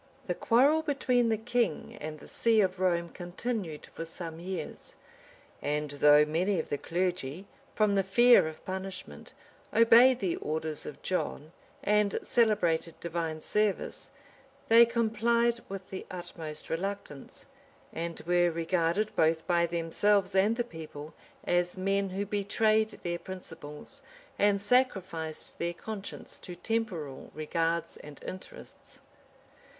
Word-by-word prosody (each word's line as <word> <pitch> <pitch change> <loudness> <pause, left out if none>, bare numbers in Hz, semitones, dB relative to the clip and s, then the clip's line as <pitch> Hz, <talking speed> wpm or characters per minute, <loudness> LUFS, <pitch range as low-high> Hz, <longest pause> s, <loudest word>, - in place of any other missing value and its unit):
] - - -30
The - - -1
quarrel 275 +7 +4
between 255 -6 +1
the 220 - +2
king 235 -6 -1
and 155 0 -6
the - - -13
see 230 -1 +2
of 190 -2 +1
Rome 170 -2 +1
continued 180 -1 -4
for - - -7
some 165 0 -7
years; 185 +1 -6 0.7
and 150 0 -1
though 150 +1 +6
many 180 +6 0
of - - -4
the 145 - -2
clergy, 180 -1 -2 0.3
from 215 -2 +3
the 195 - +3
fear 240 +1 +6
of 160 0 -9
punishment, 190 0 -7 0.4
obeyed 235 +2 +6
the 185 -6 -1
orders 155 0 -3
of 145 - -9
John, 160 -4 -2 0.3
and 210 -1 +2
celebrated 175 -8 +1
divine 165 -2 -3
service, 210 +1 -1 0.6
they 230 +1 +8
complied 235 +1 +1
with 195 -1 -6
the 190 - -6
utmost 165 -4 -7
reluctance, 175 -5 -5 0.5
and 170 0 -4
were 175 +1 +3
regarded, 170 +5 0
both 160 0 +2
by 170 -1 +2
themselves 185 +4 +1
and 200 +4 +3
the 240 - 0
people, 155 -7 -9 0.3
as 175 +1 0
men 195 +1 0
who 195 +2 -2
betrayed 215 +2 +2
their 175 0 -2
principles, 165 -5 -9 0.4
and 205 -1 +4
sacrificed 190 -9 0
their 170 0 -2
conscience 210 +1 -8
to 180 - -9
temporal 175 -9 -3
regards 165 +2 -1
and 150 -1 -12
interests. 185 - -10
185 Hz, 130 wpm, -30 LUFS, 165-215 Hz, 0.7 s, they